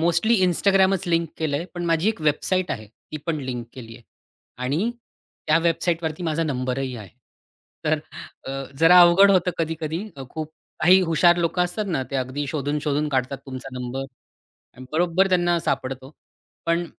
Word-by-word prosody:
Mostly 175 +8 +2
Instagramच 190 +1 +2
link 165 -1 +1
केलंय 155 0 -1
पण 175 -1 -4
माझी 165 +3 +2
एक 220 - -2
वेबसाईट 175 +5 +1
आहे, 110 -1 -4
ती 115 +8 -11
पण 165 -2 0
लिंक 125 -2 -4
केली 115 -3 -10
आहे. - - -17 0.6
आणि 160 - 0 0.6
त्या 155 +1 +4
वेबसाईटवरती 165 0 -1
माझा 165 -1 0
नंबरही 130 -2 -2
आहे. 105 -4 -9 0.8
तर - - +2 0.5
अ, - - -4 0.3
जरा 180 +2 +8
अवघड 175 +3 +7
होतं 185 -2 +3
कधी-कधी. 165 +2 -2 0.3
खूप 155 -1 -5 0.3
काही 180 +4 +6
हुशार 175 0 +4
लोकं 175 +1 +1
असतात 180 +4 -3
ना, 165 -7 0
ते 140 - -1
अगदी 130 +3 -3
शोधून-शोधून 150 +1 -1
काढतात 135 -1 -1
तुमचा 130 0 -7
नंबर 125 +2 -4 0.7
आणि 130 +1 -11
बरोबर 175 +3 +2
त्यांना 175 -2 +2
सापडतो. 130 -4 -3 0.6
पण 170 +1 +1
160 Hz, 150 wpm, -23 LUFS, 135-175 Hz, 0.8 s, जरा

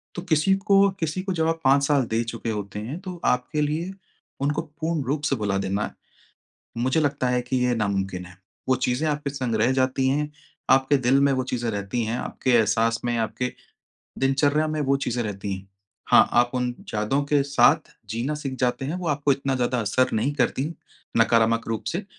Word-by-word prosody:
तो 175 - -4
किसी 170 +1 +2
को 200 0 +4
किसी 165 +3 -2
को 195 - -2
जब 160 -2 +1
आप 165 0 0
5 140 +1 +4
साल 140 -1 +3
दे 115 +1 +2
चुके 115 0 -5
होते 105 -1 -5
हैं, 130 +11 -5
तो 180 -3 -8
आपके 125 +4 +1
लिए 155 +5 -1 0.5
उनको 145 +2 0
पूर्ण 160 0 -3
रूप 140 +4 -1
से 140 -1 +1
भुला 100 -3 -1
देना, 100 +1 -2 0.8
मुझे 130 +6 +1
लगता 140 -3 0
है 125 0 +1
कि 125 +1 -2
ये 125 -1 +1
नामुमकिन 95 -4 -2
है। 90 0 -14 0.3
वो 130 - +5
चीज़ें 130 +4 0
आपके 145 -1 -2
संग 130 -5 -2
रह 110 +4 +3
जाती 130 0 +1
हैं, 150 +2 0 0.4
आपके 135 +2 +4
दिल 130 +1 +3
में 140 0 +4
वो 130 -1 0
चीज़ें 120 -2 -2
रहती 100 +3 -2
हैं, 115 +2 -2
आपके 130 - -2
एहसास 115 0 +3
में, 120 - 0
आपके 120 +3 -2 0.7
दिनचर्या 145 +3 +2
में 155 0 -2
वो 140 -1 +2
चीज़ें 125 -3 -2
रहती 100 -2 -4
हैं। 95 +1 -10 0.4
हाँ, - - +7
आप 120 0 +4
उन 125 -1 -1
यादों 110 +7 0
के 145 -1 +2
साथ 140 0 +3
जीना 120 +7 -2
सीख 140 -3 -5
जाते 125 +1 0
हैं, 145 +5 -3
वो 180 -2 -3
आपको 145 -1 +2
इतना 135 0 -1
ज़्यादा 125 0 0
असर 130 +4 +2
नहीं 120 +7 +1
करती 145 +2 0 0.4
नकारात्मक 115 0 +3
रूप 110 -2 -3
से। 185 +4 -3
130 Hz, 195 wpm, -24 LUFS, 115-145 Hz, 0.8 s, हाँ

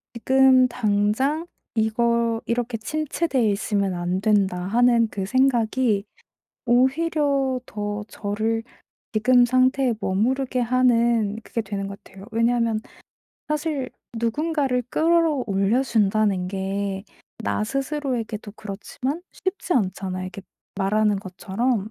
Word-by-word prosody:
지금 260 +1 +5
당장 235 +8 +1 0.3
이거 230 +1 +1
'이렇게 235 0 -1
침체돼 285 -1 0
있으면 200 -1 0
안 175 +2 -2
된다.' 200 -4 +2
하는 235 +1 +3
그 195 -1 -3
생각이 240 -3 +2 0.6
오히려 275 +1 +2
더 205 0 -4
저를 220 +2 -2 0.5
지금 245 +3 +5
상태에 255 0 +2
머무르게 250 +7 0
하는 235 -3 +2
그게 230 - -3
되는 195 -1 -4
것 200 0 -9
같아요. 195 +1 -13
왜냐하면 230 -1 +1 0.7
사실 300 -3 -2 0.3
누군가를 270 +1 0
끌어 325 -4 +2
올려 200 +6 +2
준다는 210 -5 +1
게 195 +1 -3 0.4
나 - - 0
스스로에게도 260 -5 -3
그렇지만 250 - -5
쉽지 375 -3 -3
않잖아요 190 -4 -1
이렇게 185 +1 -7 0.4
말하는 210 +1 +2
것처럼. 200 +4 -2
230 Hz, 255 characters per minute, -23 LUFS, 205-260 Hz, 0.7 s, 지금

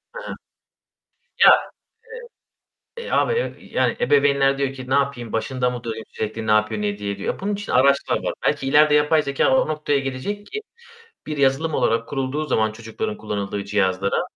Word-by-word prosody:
Hı - - -5
hı. - - -5 1.1
Ya, - - +10 1.5
e - - -5
eee, - - -7
abi 470 - +2
ya, - - -3
yani, - - -1
ebeveynler 140 -1 +3
diyor 135 -1 -1
ki, 130 -1 -9
"Ne - - 0
yapayım, 140 -5 0
başında 125 +2 -1
mı 125 -1 -6
durayım, 110 -1 -5
sürekli 110 +1 -5
ne - - +2
yapıyor 110 0 +2
ne 105 - 0
ediyor 100 0 -4
diye" 100 -1 -4
diyor. 100 - -3
Bunun 205 +2 -2
için 205 0 -5
araçlar 140 +2 +2
var. - - -1
Belki 135 - 0
ileride 150 +2 +5
yapay 150 +1 +3
zekâ 140 - +2
o 260 - +2
noktaya 150 -2 0
gelecek 135 +11 -5
ki, 430 - -5 0.7
bir 150 -1 -4
yazılım 140 +3 +1
olarak 115 -3 +1
kurulduğu 140 +2 -2
zaman 110 -6 +1
çocukların 115 - -5
kullanıldığı 100 - -4
cihazlara, 100 -1 0
135 Hz, 180 wpm, -22 LUFS, 110-150 Hz, 1.5 s, Ya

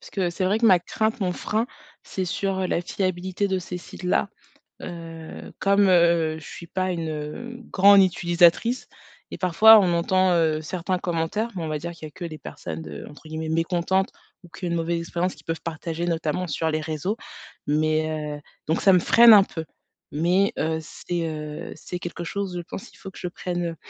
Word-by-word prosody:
parce - - -13
que 185 -3 0
c'est 185 +2 -2
vrai 200 +4 +2
que 230 - +3
ma 185 -4 +7
crainte, 220 +5 -2
mon 185 -2 0
frein, 215 +5 -1 0.4
c'est 190 - -3
sur, 190 +2 -2
heu, 185 - 0
la 175 - 0
fiabilité 185 +2 -2
de 190 - 0
ces 180 0 -6
sites-là. 180 +2 -1 0.5
Heu, 165 -2 -8
comme, 200 0 +4
heu, 170 -3 +4
je 155 - -13
suis 170 - -9
pas 185 +1 -1
une, 165 -2 -3
hem, 195 +12 -6
grande 200 +1 +7
utilisatrice 175 +6 +3 0.4
et - - -5
parfois, 215 +5 +7
on 180 -3 +2
entend, 185 +2 +2
heu, 160 -2 +2
certains 180 +3 -2
commentaires, 175 +6 -1
mais 175 - -3
on 160 - -3
va 155 -1 -2
dire 170 +2 -5
qu'il 165 -2 -9
y - - -11
a - - -24
que 175 - -7
les 155 -2 -7
personnes 80 -1 -7
de, 75 -2 -8
entre 150 +2 -14
guillemets 160 0 -4
«mécontentes» 170 +3 +1 0.3
ou 175 - -15
qui 180 - -8
ont - - -1
eu - - -2
une 170 - 0
mauvaise 170 +1 -1
expérience 170 +2 -2
qui - - -18
peuvent 165 0 -4
partager 165 +1 -4
notamment 165 +1 -1
sur 160 +1 -1
les 155 0 -1
réseaux. 160 +7 -2 0.5
Mais, 155 +1 +1 0.3
heu, - - -11 0.3
donc, 160 - +1
ça 195 - +6
me - - +7
freine 230 +5 +7
un 200 -2 +9
peu. 165 -4 -6 0.5
Mais, 180 +6 +2
heu, 160 0 0
c'est, 170 +1 -4
heu, 150 -1 -6
c'est 175 +3 -7
quelque 175 0 -6
chose, 190 +1 -3
je - - -3
pense 190 - -8
qu'il - - -20
faut 195 - -9
que - - -12
je 180 - -3
prenne, 175 0 -4
heu - - -13
175 Hz, 215 wpm, -24 LUFS, 160-190 Hz, 0.5 s, un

